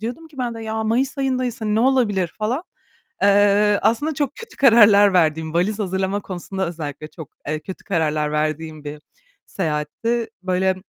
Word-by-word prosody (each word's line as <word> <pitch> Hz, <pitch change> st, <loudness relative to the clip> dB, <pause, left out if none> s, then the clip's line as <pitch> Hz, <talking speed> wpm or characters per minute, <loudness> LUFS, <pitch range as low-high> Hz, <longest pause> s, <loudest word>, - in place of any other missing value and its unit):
diyordum 245 Hz, +9 st, -6 dB
ki 290 Hz, -4 st, -17 dB
ben 240 Hz, -2 st, -2 dB
de 225 Hz, -, -7 dB
"Ya, 220 Hz, 0 st, -3 dB
mayıs 260 Hz, +5 st, 0 dB
ayındayız 255 Hz, -3 st, -1 dB
hani 215 Hz, -1 st, -1 dB
ne 220 Hz, -, +2 dB
olabilir." 225 Hz, -9 st, +1 dB
falan. 240 Hz, +9 st, -1 dB, 0.6 s
Eee, 205 Hz, +1 st, +4 dB
aslında 290 Hz, +8 st, +1 dB
çok 285 Hz, -1 st, -2 dB
kötü 465 Hz, -, -11 dB
kararlar 205 Hz, -6 st, +6 dB
verdiğim, 160 Hz, -2 st, +1 dB
valiz 200 Hz, +5 st, 0 dB
hazırlama 190 Hz, 0 st, -1 dB
konusunda 190 Hz, 0 st, -4 dB
özellikle 155 Hz, -3 st, -6 dB
çok, 160 Hz, -3 st, -11 dB, 0.2 s
eee, 155 Hz, +1 st, -2 dB
kötü 190 Hz, +3 st, -9 dB
kararlar 155 Hz, -5 st, 0 dB
verdiğim 155 Hz, 0 st, -2 dB
bir 150 Hz, 0 st, -7 dB, 0.5 s
seyahatti. 190 Hz, +8 st, -2 dB
Böyle 185 Hz, 0 st, +1 dB
200 Hz, 160 wpm, -21 LUFS, 160-230 Hz, 0.6 s, kararlar